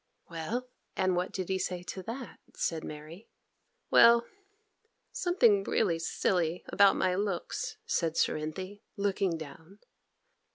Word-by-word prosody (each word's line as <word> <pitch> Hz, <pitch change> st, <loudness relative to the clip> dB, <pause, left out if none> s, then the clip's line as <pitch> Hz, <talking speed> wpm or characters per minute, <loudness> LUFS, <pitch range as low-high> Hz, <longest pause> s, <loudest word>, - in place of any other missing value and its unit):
'Well; 210 Hz, +10 st, -3 dB, 0.3 s
and 185 Hz, -1 st, +1 dB
what 180 Hz, +1 st, -1 dB
did 185 Hz, -2 st, -3 dB
he 190 Hz, 0 st, 0 dB
say 180 Hz, -1 st, -3 dB
to 190 Hz, +1 st, -6 dB
that?' 235 Hz, +6 st, -7 dB, 0.2 s
said 160 Hz, -2 st, -1 dB
Mary. 155 Hz, +6 st, -9 dB, 0.6 s
'Well, 235 Hz, 0 st, +7 dB, 0.9 s
something 235 Hz, -, +3 dB
really 175 Hz, -5 st, +1 dB
silly 170 Hz, 0 st, 0 dB
about 200 Hz, -1 st, +5 dB
my 185 Hz, -1 st, +1 dB
looks,' 205 Hz, -, -2 dB
said 165 Hz, -, 0 dB
Cerinthy, 185 Hz, +7 st, -2 dB, 0.2 s
looking 195 Hz, -3 st, 0 dB
down. 160 Hz, +5 st, -11 dB
185 Hz, 120 wpm, -30 LUFS, 165-205 Hz, 0.9 s, Well